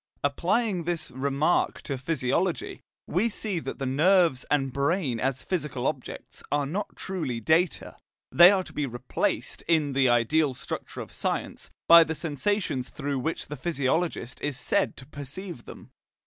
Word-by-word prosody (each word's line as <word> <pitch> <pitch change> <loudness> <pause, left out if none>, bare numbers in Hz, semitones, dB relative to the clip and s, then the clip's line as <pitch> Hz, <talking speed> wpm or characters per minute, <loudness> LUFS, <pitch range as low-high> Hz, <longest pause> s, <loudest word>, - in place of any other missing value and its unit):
Applying 180 +6 0
this 170 -2 -3
remark 140 +5 0
to 140 - -3
physiology, 155 +5 -1 0.2
we 200 +8 +1
see 205 -4 -1
that - - -6
the 135 - -3
nerves 160 0 +3
and 135 -3 +1
brain 140 -3 0
as 130 +1 -1
physical 150 -9 -3
objects - - -4
are 145 -1 +1
not 190 +9 -4
truly 155 -11 -3
data; 160 +9 +1 0.4
they 175 +2 +9
are 190 -1 +2
to - - -12
be 145 -2 -1
replaced, 120 -1 -2
in 155 -4 +2
the 135 -1 +3
ideal 130 +4 +2
structure 125 - -6
of - - -9
science, - - -3 0.2
by 170 0 +10
the 160 0 -4
sensations 155 -2 -1
through 140 -2 -3
which 160 +6 -3
the 150 - -6
physiologist 145 -2 -1
is 145 -3 -2
said - - 0
to 130 - -9
perceive 145 +2 -8
them. - - -12
150 Hz, 155 wpm, -27 LUFS, 135-175 Hz, 0.4 s, by